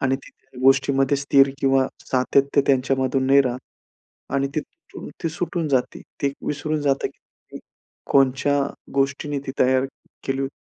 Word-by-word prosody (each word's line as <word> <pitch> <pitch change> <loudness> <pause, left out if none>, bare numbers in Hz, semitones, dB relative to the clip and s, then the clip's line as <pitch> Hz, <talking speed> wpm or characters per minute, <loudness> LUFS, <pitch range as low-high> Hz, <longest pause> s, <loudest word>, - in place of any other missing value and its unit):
आणि 135 0 +1
ती - - -16 0.3
गोष्टीमध्ये 135 +1 +3
स्थिर 140 0 +4
किंवा 135 -1 +3 0.2
सातत्य, 140 +2 +2
त्यांच्यामधून 130 0 +1
नाही 140 +1 +6
राहत 125 -1 -2 0.8
आणि 140 0 +1
ती, 155 - +1 0.6
ती 165 - 0
सुटून 170 0 -3
जाते. 130 -3 0 0.2
ते 140 0 +1
विसरून 150 +1 -2
जातं 140 -1 +1
की - - -16 0.5
कोणच्या 135 +1 +3 0.3
गोष्टीने 140 +1 0
ती 135 - -4
तयार 130 +1 +3 0.4
केली 135 0 -1
होती. 135 0 -3
135 Hz, 135 wpm, -22 LUFS, 135-140 Hz, 0.8 s, नाही